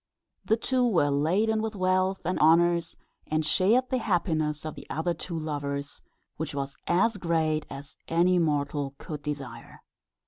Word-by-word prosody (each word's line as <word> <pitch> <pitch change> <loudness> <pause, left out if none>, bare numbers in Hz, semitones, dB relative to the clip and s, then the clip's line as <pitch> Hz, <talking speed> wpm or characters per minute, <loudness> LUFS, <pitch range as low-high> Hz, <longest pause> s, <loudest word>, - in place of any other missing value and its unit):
The 220 - +2
two 255 +2 +1
were 165 -10 +2
laden 195 +10 +2
with 220 0 -3
wealth 185 0 +1
and 180 +2 0
honours, 170 +1 +4 0.3
and 155 0 0
shared 225 +11 +2
the 255 - +1
happiness 160 -7 0
of 155 - -4
the - - -11
other 165 +3 -1
two 170 0 -6
lovers, 145 -2 -4 0.4
which 155 -1 -4
was 140 -1 -3
as 200 +5 +2
great 160 -4 0
as 140 +1 -9
any 175 +2 +3
mortal 145 -3 -1
could 150 -2 -7
desire. 135 -6 -7
165 Hz, 150 wpm, -27 LUFS, 150-185 Hz, 0.4 s, honours